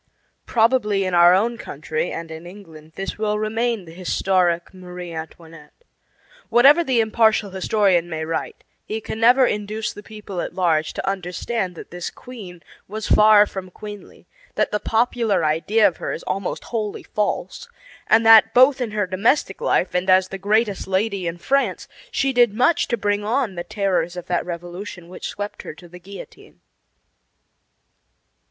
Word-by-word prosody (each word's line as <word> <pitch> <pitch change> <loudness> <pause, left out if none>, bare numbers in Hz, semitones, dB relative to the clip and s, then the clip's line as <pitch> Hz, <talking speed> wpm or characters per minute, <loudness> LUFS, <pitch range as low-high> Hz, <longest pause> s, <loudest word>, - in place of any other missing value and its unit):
Probably 220 -4 +2
in 185 - -2
our 175 +1 +7
own 230 +4 0
country 155 +1 -4
and 165 -1 -6
in 160 +2 -9
England 160 -5 -14
this 195 +2 -5
will 210 -1 0
remain 220 -1 -1
the 165 - -12
historic 180 -1 0
Marie 180 -2 -9
Antoinette. 160 - -11 0.7
Whatever 275 +8 +6
the 255 -6 +2
impartial 220 -2 +2
historian 190 -2 +1
may 160 -1 -4
write, 160 0 -4 0.2
he 220 - -4
can 220 - -6
never 250 +3 +5
induce 210 0 -3
the 205 - -10
people 210 -4 -7
at - - -6
large 160 -4 +1
to - - -5
understand 190 +1 -3
that - - -11
this 175 0 -5
queen 195 -9 -11 0.2
was 215 +2 -5
far 210 -1 +6
from 190 -2 -7
queenly, 205 +2 -11 0.3
that - - 0
the 210 - 0
popular 225 -5 +1
idea 165 +8 +3
of 175 - -3
her - - -4
is - - -6
almost 195 -1 -3
wholly 215 -3 -3
false, 215 - -3 0.4
and 225 +1 +4
that 225 0 +7
both 260 +2 +5
in 240 - -1
her 210 -1 -1
domestic 195 +3 0
life 180 - +1
and 180 +1 -1
as 185 0 +4
the 195 - -6
greatest 205 0 0
lady 195 -1 -1
in 170 +1 -4
France 275 +10 -1 0.2
she 275 - 0
did 240 -4 +3
much 255 +8 +2
to 235 - -1
bring 205 -1 -1
on 230 0 0
the 175 -1 -5
terrors 180 -2 -1
of 180 - -6
that 175 0 -2
revolution 175 +1 -7
which 180 - -7
swept 205 0 -6
her - - -9
to 175 - -14
the 180 +1 -13
guillotine. 195 +3 -13
200 Hz, 165 wpm, -21 LUFS, 175-220 Hz, 0.7 s, our